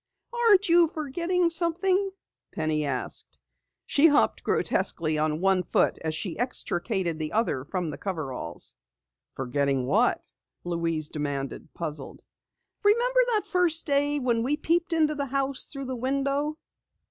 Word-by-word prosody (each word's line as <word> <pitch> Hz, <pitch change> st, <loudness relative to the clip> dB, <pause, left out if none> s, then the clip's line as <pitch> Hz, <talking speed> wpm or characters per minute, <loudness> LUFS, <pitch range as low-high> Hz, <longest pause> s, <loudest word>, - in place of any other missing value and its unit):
"Aren't 440 Hz, -5 st, +4 dB
you 340 Hz, 0 st, +6 dB
forgetting 335 Hz, +3 st, -1 dB
something?" 365 Hz, +4 st, +2 dB, 0.4 s
Penny 155 Hz, -1 st, -1 dB
asked. 130 Hz, -2 st, -4 dB, 0.5 s
She 290 Hz, +3 st, +5 dB
hopped 295 Hz, -2 st, +2 dB
grotesquely 155 Hz, -2 st, +1 dB
on 155 Hz, +1 st, 0 dB
one 190 Hz, -1 st, +3 dB
foot -, -, +1 dB
as 160 Hz, -1 st, -2 dB
she 175 Hz, +2 st, -4 dB
extricated 190 Hz, -7 st, -1 dB
the 155 Hz, -1 st, -4 dB
other 210 Hz, -, 0 dB
from 175 Hz, 0 st, -3 dB
the -, -, -8 dB
coveralls. 140 Hz, -, -3 dB, 0.6 s
"Forgetting 135 Hz, 0 st, 0 dB
what?" -, -, +2 dB, 0.4 s
Louise 165 Hz, -3 st, -1 dB
demanded, 145 Hz, -2 st, -4 dB
puzzled. 150 Hz, -4 st, -5 dB, 0.6 s
"Remember 480 Hz, +4 st, +3 dB
that 425 Hz, -, +1 dB
first 350 Hz, -3 st, +1 dB
day 290 Hz, 0 st, +2 dB
we 250 Hz, +1 st, 0 dB
peeped 340 Hz, +4 st, 0 dB
into 315 Hz, -2 st, +2 dB
the 280 Hz, -1 st, -3 dB
house 275 Hz, 0 st, 0 dB
through 275 Hz, -2 st, -6 dB
the 260 Hz, 0 st, -4 dB
window?" 275 Hz, +4 st, -1 dB
255 Hz, 130 wpm, -26 LUFS, -, 0.6 s, you